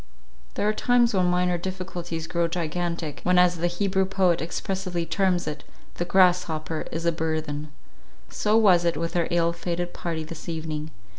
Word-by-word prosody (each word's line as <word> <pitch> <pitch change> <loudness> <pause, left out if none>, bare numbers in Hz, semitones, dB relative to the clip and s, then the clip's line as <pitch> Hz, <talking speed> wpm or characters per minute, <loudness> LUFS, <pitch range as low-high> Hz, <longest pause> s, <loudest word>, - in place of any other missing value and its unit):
There 205 - 0
are 215 - +3
times 240 +1 +3
when 185 -2 +3
minor 180 0 +1
difficulties 175 -3 -5
grow 170 +1 0
gigantic 170 -2 -3
—times, - - -15
when 180 0 +4
as 180 -1 +5
the 170 +1 +1
Hebrew 190 +2 +1
poet 185 -3 +2
expressively 180 0 -3
terms 185 -1 +1
it, 150 -1 -5 0.3
"the 175 - -1
grasshopper 175 -4 +2
is 165 +1 -4
a 170 - +4
burthen;" 155 -2 -3 0.6
so 215 +1 +1
was 185 -6 +5
it 170 -2 +1
with 165 +2 -3
our 170 -1 +2
ill 170 0 +2
fated 175 +1 -3
party 165 -2 -3
this 160 +1 -8
evening. 155 -1 -4
175 Hz, 170 wpm, -25 LUFS, 165-185 Hz, 0.6 s, as